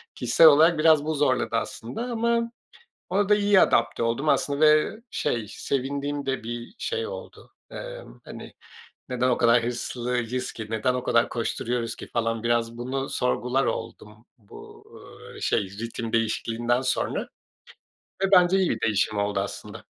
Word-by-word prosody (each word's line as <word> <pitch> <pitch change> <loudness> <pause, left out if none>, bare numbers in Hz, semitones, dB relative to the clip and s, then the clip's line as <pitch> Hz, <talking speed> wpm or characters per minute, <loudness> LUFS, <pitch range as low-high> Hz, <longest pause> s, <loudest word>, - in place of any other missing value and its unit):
Kişisel 165 - +5
olarak 155 +2 +6
biraz 155 -2 +5
bu 160 0 -1
zorladı 130 -5 +1
aslında 115 - -4
ama 235 -1 0 0.6
ona 195 +2 +1
da 210 - +6
iyi 205 -2 +4
adapte 115 0 +2
oldum 120 +6 0
aslında 145 0 +1
ve, 155 +8 +4
şey, 110 -3 -2
sevindiğim 140 +1 -3
de 135 -4 -2
bir 120 - -7
şey 455 - -3
oldu. - - -10 0.2
Emm, - - -9
hani, - - -10 0.6
"Neden 125 0 0
o 125 - +2
kadar 115 0 +4
hırslıyız 125 +1 -3
ki, 110 -1 -7
neden 115 +3 0
o 125 0 -3
kadar 115 -1 +2
koşturuyoruz 115 0 -2
ki?" - - -10
falan 115 -1 -1
biraz 115 0 0
bunu 135 +2 -3
sorgular 125 +1 0
oldum. 105 +2 -6
Bu, 105 -4 -14 0.5
ööö, - - -11
şey, - - +1
ritim 115 +4 -6
değişikliğinden 115 +2 0
sonra 130 - -2 0.9
ve 195 - +1
bence 180 0 +6
iyi 190 -2 +2
bir - - -1
değişim 105 -1 +1
oldu 100 0 0
aslında. - - -6
125 Hz, 150 wpm, -25 LUFS, 115-155 Hz, 0.9 s, olarak